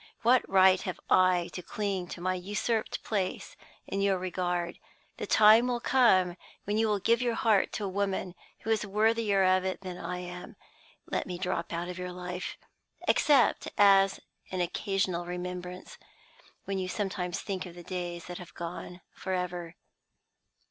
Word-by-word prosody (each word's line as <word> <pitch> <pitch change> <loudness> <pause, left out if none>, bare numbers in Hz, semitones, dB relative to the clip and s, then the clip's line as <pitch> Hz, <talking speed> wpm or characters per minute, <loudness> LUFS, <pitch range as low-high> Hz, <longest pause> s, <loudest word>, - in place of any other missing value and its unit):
What 245 +2 +5
right 190 -1 +6
have 185 - -5
I 185 -2 +4
to 180 - -5
cling 195 -1 -3
to 175 - -8
my 185 +1 +1
usurped 210 +5 -2
place 195 -4 -2 0.3
in 195 - -2
your 195 -1 +2
regard? 180 -1 -2 0.4
The - - -4
time 220 +3 +7
will 245 -1 0
come 190 -9 +3 0.3
when 210 +2 -1
you 225 - +3
will 210 -1 +2
give 230 +4 +2
your 240 -2 0
heart 215 -4 +3
to 210 - -2
a - - -1
woman 190 -1 -2 0.3
who 225 - -2
is 220 - +2
worthier 210 -1 +2
of 185 0 +4
it 190 0 -3
than 185 -2 -7
I 180 +1 -4
am. 180 0 -8 0.5
Let - - -2
me 180 -1 -4
drop 175 -2 -2
out 170 +1 -3
of 180 0 -6
your 180 0 -4
life 180 0 -5 0.5
except 280 -5 +4
as 195 -1 +5 0.3
an 185 - -3
occasional 180 -1 -1
remembrance, 180 0 -6 0.7
when 195 -1 -2
you 185 - -2
sometimes 185 -3 -2
think 190 -3 -4
of 175 - -11
the 175 - -10
days 175 -1 -5
that 180 +1 -7
have 175 -2 -11
gone 175 +1 -7
forever. 180 -2 -4
185 Hz, 165 wpm, -29 LUFS, 180-205 Hz, 0.7 s, time